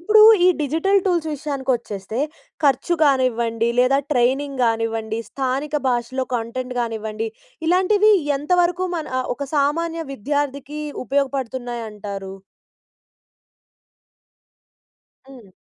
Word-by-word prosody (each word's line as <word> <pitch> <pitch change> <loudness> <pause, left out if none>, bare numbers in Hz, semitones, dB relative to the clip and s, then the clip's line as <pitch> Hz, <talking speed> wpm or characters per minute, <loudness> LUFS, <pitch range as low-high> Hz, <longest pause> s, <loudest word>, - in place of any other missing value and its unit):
ఇప్పుడు 425 +5 +5 0.3
ఈ - - +7
digital 325 +8 +2
tools 345 -4 +1
విషయానికి 275 -2 -3
వచ్చేస్తే, 215 0 -6 0.4
ఖర్చు 280 +5 +2
కానివ్వండి 235 -5 +2
లేదా, 255 +2 +4 0.2
ట్రైనింగ్ 265 +2 +1
గానివ్వండి 225 -1 -1
స్థానిక 275 +3 -2
భాషలో 250 +1 -1
కంటెంట్ 250 +2 -3
కానివ్వండి, 220 -1 -3 0.4
ఇలాంటివి 395 +5 +4 0.2
ఎంతవరకు 355 +4 +1
మన 315 - -4
అ - - -1
ఒక 280 +1 -6
సామాన్య 330 +4 0
విద్యార్థికి 285 +3 -3 0.2
ఉపయోగపడుతున్నాయి 260 -3 -2
అంటారు? 200 -2 -7 3.0
హ్మ్. 245 -7 -14
265 Hz, 95 wpm, -21 LUFS, 230-300 Hz, 3.0 s, ఈ